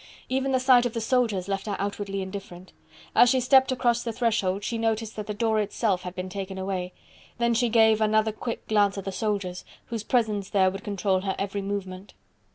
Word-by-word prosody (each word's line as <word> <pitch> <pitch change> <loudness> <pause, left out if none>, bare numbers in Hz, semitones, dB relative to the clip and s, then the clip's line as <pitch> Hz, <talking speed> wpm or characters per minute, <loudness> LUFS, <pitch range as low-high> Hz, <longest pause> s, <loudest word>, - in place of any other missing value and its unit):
Even 265 +1 0
the 260 - +2
sight 255 -1 +5
of 230 - -8
the 230 - -2
soldiers 225 -5 0
left 195 +2 -3
her 205 - -1
outwardly 200 -1 -3
indifferent. 190 -2 -9 0.4
As 245 - +7
she 260 +1 +3
stepped 260 +1 +4
across 240 -2 +1
the 235 - -3
threshold 215 -4 0
she 230 +2 -2
noticed 225 -1 -1
that 210 -1 -6
the 210 - -2
door 220 0 +1
itself 205 -2 0
had 180 0 -7
been 185 0 -4
taken 190 0 -6
away: 190 -1 -3 0.5
then 235 0 +2
she 240 +1 +2
gave 220 -1 +4
another 215 0 +3
quick 230 +2 -6
glance 205 -2 +2
at 195 - -5
the 195 - -3
soldiers, 190 -2 -2 0.2
whose 230 -2 -4
presence 215 -4 0
there 190 -2 +3
would 195 +2 -8
control 200 -3 0
her 190 0 -2
every 200 0 -3
movement. 195 -1 -5
210 Hz, 205 wpm, -26 LUFS, 195-230 Hz, 0.5 s, As